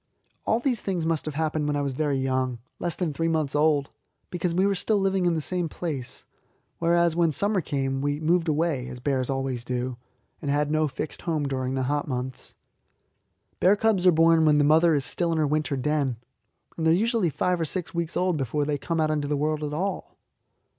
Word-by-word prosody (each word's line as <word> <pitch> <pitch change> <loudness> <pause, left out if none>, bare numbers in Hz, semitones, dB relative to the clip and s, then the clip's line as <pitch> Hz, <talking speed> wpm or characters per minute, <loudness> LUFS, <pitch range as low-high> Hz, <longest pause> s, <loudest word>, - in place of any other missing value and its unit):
All 225 - +3
these 245 -2 0
things 180 -4 -2
must 160 -3 0
have 155 -2 -4
happened 155 -1 -1
when 145 - 0
I 145 - 0
was 140 -1 -2
very 145 0 0
young 130 -2 -1 0.2
less 175 -2 -1
than 170 -5 -2
three 165 +3 -1
months 155 -4 0
old 150 -2 +2 0.4
because 175 0 -1
we 185 +2 +3
were 200 - +2
still 205 +3 0
living 195 -2 +1
in 170 - +2
the 160 - -1
same 175 +1 0
place, 140 -8 -5 0.5
whereas 170 0 +3
when 170 -2 +3
summer 200 +5 +1
came 135 -3 -2
we 145 +1 -1
moved 165 +2 +1
away, 155 -4 0
as 125 0 -8
bears 130 -1 -1
always 135 -3 -2
do, 125 0 -3 0.4
and 145 - -3
had 145 +1 +1
no 155 0 +2
fixed 150 +2 -6
home 155 -4 -1
during 130 -1 -2
the 130 - 0
hot 145 +2 -1
months. 130 -1 -5 1.0
Bear 190 +3 +5
cubs 205 -4 +2
are - - +8
born 165 0 +4
when 150 -1 +5
the 145 - +4
mother 160 +2 +5
is 140 - 0
still 170 -2 -1
in 165 - 0
her 155 - +2
winter 145 -1 0
den, 140 -2 0 0.6
and 160 -1 0
they - - +5
are - - +5
usually 225 -2 +1
five 180 +4 0
or - - +1
six 175 +5 -4
weeks 170 -1 -2
old 180 -3 +1
before 145 +2 -1
they 145 -1 -1
come 165 +3 -2
out 155 -1 +2
into 150 -2 -1
the 145 0 0
world 155 +1 -1
at 150 - -3
all. 190 +6 -3
155 Hz, 220 wpm, -26 LUFS, 140-170 Hz, 1.0 s, are